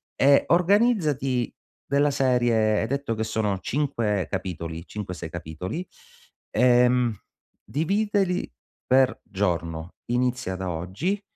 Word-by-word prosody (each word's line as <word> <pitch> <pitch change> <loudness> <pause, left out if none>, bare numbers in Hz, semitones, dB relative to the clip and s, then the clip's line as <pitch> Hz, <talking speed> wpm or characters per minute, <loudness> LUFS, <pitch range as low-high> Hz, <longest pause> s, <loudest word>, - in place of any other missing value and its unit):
e 140 +1 +5
organizzati 170 - +2 0.3
della 140 +1 +2
serie, 120 -5 +2
hai 110 - -1
detto 140 -3 -2
che 110 - -2
sono 110 -2 -1
5 115 -8 -1
capitoli, 85 -4 -4
cinque, 105 -3 -6
sei 80 - -6
capitoli, 85 - -5 0.7
ehm, 125 0 +4 0.5
dividili 195 +3 0 0.4
per 130 0 +3
giorno, 85 -4 -2
inizia 125 -5 0
da 95 0 -4
oggi 95 - -2
120 Hz, 105 wpm, -25 LUFS, 95-140 Hz, 0.7 s, e